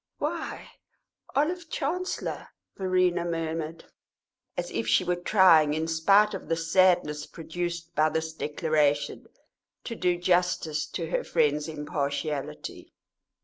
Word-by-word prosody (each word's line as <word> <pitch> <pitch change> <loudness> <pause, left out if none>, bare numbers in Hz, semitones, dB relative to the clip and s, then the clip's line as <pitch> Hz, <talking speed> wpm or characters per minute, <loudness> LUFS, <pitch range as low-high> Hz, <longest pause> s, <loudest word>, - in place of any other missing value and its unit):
"Why, - - -4 0.6
Olive 330 +4 0
Chancellor!" 360 +6 -3 0.3
Verena 185 -2 +1
murmured, 165 -1 -3 0.7
as - - -3
if 115 0 -2
she 110 - +4
were 180 0 0
trying, 175 -5 +5
in 160 +1 -1
spite 195 +6 +4
of 195 - -6
the 165 - +2
sadness 165 -3 +2
produced 170 +1 -5
by 155 +1 +3
this 160 +1 -2
declaration, 150 -2 0 0.6
to 230 - -5
do 180 -4 +1
justice 175 -4 +1
to 165 +2 -5
her - - 0
friend's 150 -2 +1
impartiality. 145 -1 -4
165 Hz, 115 wpm, -27 LUFS, 155-180 Hz, 0.7 s, trying